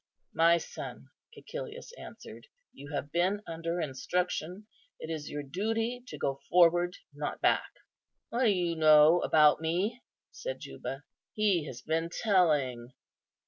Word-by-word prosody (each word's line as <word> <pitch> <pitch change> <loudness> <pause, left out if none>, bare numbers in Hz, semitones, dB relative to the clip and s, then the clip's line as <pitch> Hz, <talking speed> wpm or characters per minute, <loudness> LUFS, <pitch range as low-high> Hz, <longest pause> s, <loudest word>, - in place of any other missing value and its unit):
"My 170 +1 +5
son," 160 - -8 0.3
Cæcilius 485 0 -8
answered, - - -11 0.3
"you 145 +2 -11
have 145 0 -4
been 185 +5 +1
under 165 +1 -3
instruction; 175 +6 -2 0.3
it 160 - -6
is 155 -2 -5
your 145 0 -4
duty 225 - -2
to - - -8
go 135 0 -2
forward, 175 0 +4 0.2
not 145 +1 -4
back." - - +2 0.6
"What 245 +2 +1
do - - +5
you 175 -4 +1
know 155 +1 +6
about 150 0 +5
me?" 185 +9 -1 0.3
said - - -6
Juba; 135 +2 -7 0.3
"he 195 -8 +1
has 125 - -8
been 165 +1 -1
telling." 150 - +1
170 Hz, 135 wpm, -30 LUFS, 150-200 Hz, 0.6 s, know